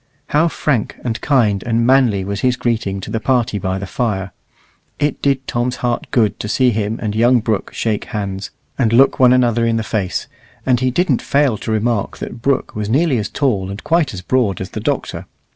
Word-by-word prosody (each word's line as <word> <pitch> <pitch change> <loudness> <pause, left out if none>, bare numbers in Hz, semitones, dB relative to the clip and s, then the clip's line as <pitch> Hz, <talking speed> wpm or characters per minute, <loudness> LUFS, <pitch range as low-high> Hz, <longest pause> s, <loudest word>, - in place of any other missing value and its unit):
How 155 +3 +3
frank, 145 -7 -1
and 115 -2 -3
kind, 110 -9 +2
and 115 +1 0
manly 120 -7 +3
was 100 0 -3
his 125 +2 +2
greeting 110 -6 -1
to - - -7
the 110 - -1
party 120 -4 +1
by 95 0 -2
the 100 - -4
fire! 95 -3 -2 0.7
It 145 -1 -1
did 135 -1 +1
Tom's 120 +1 -1
heart 120 -2 -2
good 110 -5 +1
to - - -4
see 125 +3 +3
him 110 0 -2
and 105 -2 -2
young 120 +2 +4
Brooke 110 -3 -2
shake 110 -2 -2
hands, 95 -2 -4 0.3
and 115 -4 +2
look 135 +4 +5
one 125 -1 +6
another 120 -2 +3
in 115 0 +2
the 110 - -1
face; 95 -6 -2 0.4
and 125 -2 +3
he 130 0 +1
didn't 140 0 +1
fail 140 -4 +2
to 110 - -4
remark 110 -1 0
that 120 - -7
Brooke 135 +2 0
was 105 -1 -3
nearly 135 0 +2
as 105 - -3
tall 105 -10 0
and 100 +2 -7
quite 160 -4 +2
as 95 - -7
broad 115 -5 +1
as 95 - -6
the - - -5
Doctor. - - -3
115 Hz, 210 wpm, -18 LUFS, 105-130 Hz, 0.7 s, one